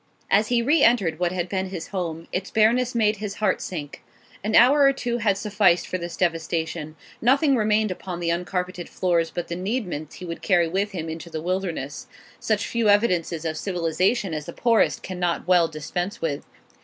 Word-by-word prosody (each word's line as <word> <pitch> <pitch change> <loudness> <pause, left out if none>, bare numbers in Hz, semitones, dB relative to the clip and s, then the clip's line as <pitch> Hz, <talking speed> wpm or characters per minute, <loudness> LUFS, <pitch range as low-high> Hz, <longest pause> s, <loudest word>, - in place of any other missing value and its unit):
As 210 +2 +4
he 235 0 +2
re 300 +6 +3
entered 195 -9 +3
what 175 -1 +1
had 180 -1 -2
been 190 0 -2
his 185 -3 -6
home, 165 -4 -4
its 185 +1 -3
bareness 235 +3 +2
made 215 -2 +2
his 205 -1 -5
heart 215 - 0
sink. 150 -6 -6 0.4
An 215 +1 0
hour 270 +5 +6
or 275 -1 +6
two 240 -2 -2
had 205 -4 +2
sufficed 200 -4 +2
for 185 - -3
this 170 0 -6
devastation; 165 -2 -2 0.3
nothing 275 +4 +4
remained 215 -2 +2
upon 180 -1 -6
the 170 -1 0
uncarpeted 180 0 -3
floors 170 -3 +1
but 175 +1 -5
the 170 - -4
needments 180 - -3
he 180 - -8
would 170 -1 -6
carry 175 -3 +3
with 195 +5 -1
him 165 -3 -4
into 160 +1 -6
the 160 -1 -4
wilderness, 175 - -3 0.3
such 215 -1 0
few 230 -2 +1
evidences 180 -6 +2
of 160 -1 -2
civilisation 185 +2 0
as 150 -1 -4
the - - -6
poorest 230 -2 +2
cannot 180 -2 -2
well 175 -2 +5
dispense 175 +5 -4
with. 150 -3 -3
185 Hz, 190 wpm, -24 LUFS, 170-215 Hz, 0.4 s, hour